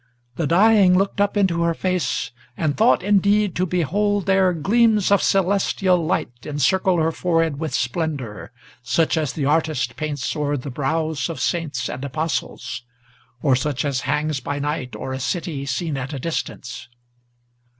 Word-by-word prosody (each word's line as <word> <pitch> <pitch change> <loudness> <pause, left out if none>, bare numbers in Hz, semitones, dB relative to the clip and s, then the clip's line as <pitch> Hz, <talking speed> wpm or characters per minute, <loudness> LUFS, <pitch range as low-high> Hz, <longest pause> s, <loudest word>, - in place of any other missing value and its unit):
The 165 - -1
dying 190 +1 +5
Looked 195 +1 0
up 205 +1 +1
into 180 -4 +2
her 170 -1 +1
face, 185 -1 -1 0.3
and 155 -3 0
thought, 220 -4 +3
indeed, 205 0 +3
to 185 +1 +1
behold 195 +4 0
there 190 -1 +3
Gleams 210 +4 +2
of 200 - +5
celestial 190 -2 +2
light 155 - -1
encircle 175 +6 +1
her 160 0 +2
forehead 165 -4 0
with 160 -1 -3
splendor, 125 - -3 0.3
Such 155 +8 +1
as 150 -4 -1
the 145 - -2
artist 150 -5 0
paints 145 -3 -3
o'er 145 -1 -1
the 135 +1 -6
brows 155 +4 -1
of 165 - -5
saints 150 -8 -1
and 130 - -6
apostles, 140 -5 -3 0.6
Or 135 -3 +4
such 140 +2 -1
as 135 -3 -1
hangs 150 -1 -1
by 140 +3 -4
night 145 -2 -3
o'er 130 - -5
a 130 - -4
city 145 -1 -3
seen 145 +4 -2
at 135 +3 -5
a 140 - -4
distance. 130 -5 -5
160 Hz, 160 wpm, -22 LUFS, 140-185 Hz, 0.6 s, dying